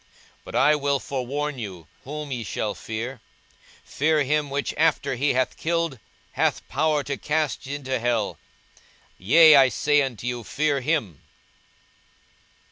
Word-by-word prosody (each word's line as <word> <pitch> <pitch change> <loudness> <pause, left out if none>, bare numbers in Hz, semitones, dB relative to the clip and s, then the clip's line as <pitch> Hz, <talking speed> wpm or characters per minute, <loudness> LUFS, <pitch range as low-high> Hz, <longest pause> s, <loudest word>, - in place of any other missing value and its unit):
42:012:005 - - -34 0.4
But - - -8
I 150 +3 +5
will 140 -1 0
forewarn 140 +2 -3
you 95 -8 -7 0.2
whom 150 +1 -6
ye 120 -3 -3
shall 105 0 -3
fear: 115 +3 -6 0.6
Fear 155 +1 +1
him, 150 +1 0
which 140 +1 -2
after 160 -3 +1
he 140 +3 +1
hath 130 +1 0
killed 165 -5 -1 0.3
hath - - -1
power 155 -2 +1
to 140 0 -4
cast 150 -3 -2
into 135 -2 -3
hell; 115 -3 -1 0.8
yea, 155 - +7
I 135 -2 +7
say 145 +4 +2
unto 125 -5 -4
you, 120 -1 -3
Fear 145 +6 0
him. 120 - -1
140 Hz, 140 wpm, -24 LUFS, 120-150 Hz, 0.8 s, yea